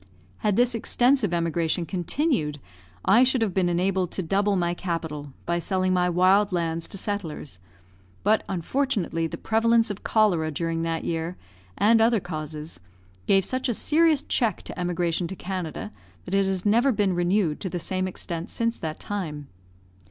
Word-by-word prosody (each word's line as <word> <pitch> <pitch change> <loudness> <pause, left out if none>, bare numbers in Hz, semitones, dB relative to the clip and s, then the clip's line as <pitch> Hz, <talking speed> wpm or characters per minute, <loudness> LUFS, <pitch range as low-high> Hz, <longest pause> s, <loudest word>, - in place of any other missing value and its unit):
Had 210 -2 0
this 245 +2 +3
extensive 240 -1 +2
emigration 170 0 0
continued, 180 - -1 0.5
I 225 +6 +6
should 255 -2 +2
have 205 -5 -1
been 180 -1 +2
enabled 180 +1 +1
to 190 - -2
double 200 +4 +1
my 175 -2 +1
capital, 160 -5 -4
by 170 0 0
selling 185 +1 0
my 180 -1 +2
wild 190 +4 +4
lands 165 -2 -1
to - - -9
settlers; 170 - -5 0.6
but, 215 +2 +3
unfortunately, 190 - -1
the - - -6
prevalence 225 0 +2
of 205 - -8
cholera 185 -8 +2
during 165 +2 -2
that 165 0 -2
year, 165 +2 -3 0.4
and 225 +2 +5
other 225 0 +4
causes, 155 - -6 0.5
gave 195 -1 +4
such 255 0 -1
a 235 - 0
serious 315 +1 +3
check 225 -7 0
to - - -8
emigration 175 -1 0
to 190 - -6
Canada 185 +1 -5 0.3
that 180 - -6
it 195 -1 +3
has 190 -1 -2
never 235 +6 +4
been 205 -5 +1
renewed 175 -2 +1
to 190 - -4
the 175 - -3
same 185 +2 -1
extent 170 -2 -5
since 230 0 -1
that 155 -1 -5
time. 155 -8 -5
185 Hz, 165 wpm, -25 LUFS, 165-210 Hz, 0.6 s, I